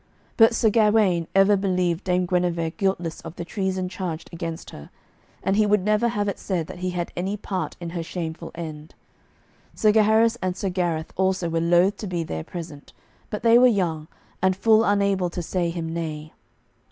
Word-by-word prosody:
But 225 Hz, 0 st, +5 dB
Sir 220 Hz, -2 st, +3 dB
Gawaine 210 Hz, -6 st, +3 dB
ever 195 Hz, +1 st, +6 dB
believed 185 Hz, -2 st, 0 dB
Dame 180 Hz, 0 st, +1 dB
Guenever 175 Hz, -2 st, 0 dB
guiltless 185 Hz, -4 st, -2 dB
of 160 Hz, -, -9 dB
the 175 Hz, -, -6 dB
treason 190 Hz, -1 st, -2 dB
charged 180 Hz, -3 st, -5 dB
against 165 Hz, -1 st, -6 dB
her, 75 Hz, -, -11 dB, 0.5 s
and 195 Hz, -, +1 dB
he 215 Hz, 0 st, +3 dB
would 205 Hz, -2 st, +2 dB
never 215 Hz, +2 st, +2 dB
have 210 Hz, -3 st, -1 dB
it 200 Hz, -, -3 dB
said 180 Hz, -5 st, -2 dB
that 175 Hz, -, -10 dB
he 185 Hz, 0 st, -2 dB
had 175 Hz, -1 st, -3 dB
any 190 Hz, +4 st, -2 dB
part 190 Hz, -2 st, -4 dB
in 170 Hz, -1 st, -6 dB
her 170 Hz, -1 st, -3 dB
shameful 165 Hz, -1 st, -5 dB
end. 155 Hz, -2 st, -8 dB, 0.8 s
Sir 215 Hz, -, +4 dB
Gaheris 220 Hz, +2 st, +4 dB
and 185 Hz, -1 st, -2 dB
Sir 195 Hz, -, -2 dB
Gareth 175 Hz, -3 st, -2 dB
also 190 Hz, -2 st, +1 dB
were 165 Hz, 0 st, 0 dB
loath 175 Hz, +4 st, +3 dB
to 210 Hz, -, -6 dB
be 175 Hz, -2 st, -2 dB
there 80 Hz, -, -5 dB
present, 160 Hz, -, -9 dB, 0.4 s
but 210 Hz, -, -5 dB
they 230 Hz, +1 st, +6 dB
were 255 Hz, -, +7 dB
young, 170 Hz, -9 st, 0 dB, 0.3 s
and 190 Hz, 0 st, +3 dB
full 220 Hz, +3 st, +4 dB
unable 200 Hz, -3 st, +1 dB
to 175 Hz, 0 st, -5 dB
say 175 Hz, 0 st, -1 dB
him 165 Hz, -1 st, -4 dB
nay. 155 Hz, -2 st, -5 dB
180 Hz, 190 wpm, -24 LUFS, 170-205 Hz, 0.8 s, were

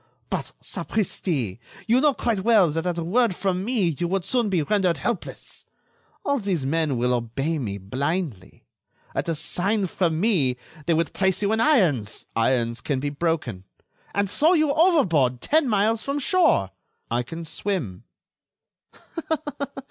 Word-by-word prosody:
"But, -, -, -3 dB
sapristi! 150 Hz, -, -2 dB, 0.3 s
you 240 Hz, +3 st, +3 dB
know 295 Hz, -2 st, +3 dB
quite 230 Hz, -4 st, 0 dB
well 195 Hz, -5 st, +4 dB
that 165 Hz, +3 st, -2 dB
at 175 Hz, -1 st, -1 dB
a 170 Hz, -, -2 dB
word 215 Hz, +3 st, +2 dB
from 185 Hz, 0 st, -1 dB
me 215 Hz, -5 st, +1 dB
you 175 Hz, -, 0 dB
would 190 Hz, 0 st, -1 dB
soon 240 Hz, -4 st, +1 dB
be 180 Hz, -5 st, +1 dB
rendered 185 Hz, -2 st, +1 dB
helpless. 205 Hz, +7 st, -5 dB, 0.6 s
All 280 Hz, -4 st, +1 dB
these 185 Hz, -, -1 dB
men 155 Hz, -2 st, 0 dB
will 125 Hz, +1 st, +1 dB
obey 135 Hz, +7 st, -1 dB
me 100 Hz, -6 st, -3 dB
blindly. 130 Hz, -, -4 dB, 0.5 s
At -, -, -2 dB
a 165 Hz, -, 0 dB
sign 195 Hz, +7 st, 0 dB
from 170 Hz, -3 st, 0 dB
me 165 Hz, -, +2 dB, 0.3 s
they 170 Hz, -, +3 dB
would 165 Hz, 0 st, 0 dB
place 190 Hz, 0 st, +1 dB
you 200 Hz, -, +2 dB
in 220 Hz, -, +1 dB
irons——" 170 Hz, -, +2 dB
"Irons 115 Hz, 0 st, +1 dB
can 140 Hz, -3 st, -1 dB
be 145 Hz, +2 st, -2 dB
broken." 145 Hz, -, -2 dB, 0.5 s
"And 200 Hz, 0 st, +2 dB
throw 310 Hz, -, +3 dB
you 310 Hz, -4 st, +3 dB
overboard 190 Hz, -, +3 dB
ten 305 Hz, -, +2 dB
miles 215 Hz, +1 st, +2 dB
from 280 Hz, +1 st, -2 dB
shore." 290 Hz, -, +3 dB, 0.4 s
"I 120 Hz, +1 st, +1 dB
can 165 Hz, +7 st, -7 dB
swim." 150 Hz, -, -3 dB
175 Hz, 155 wpm, -24 LUFS, 135-215 Hz, 0.6 s, well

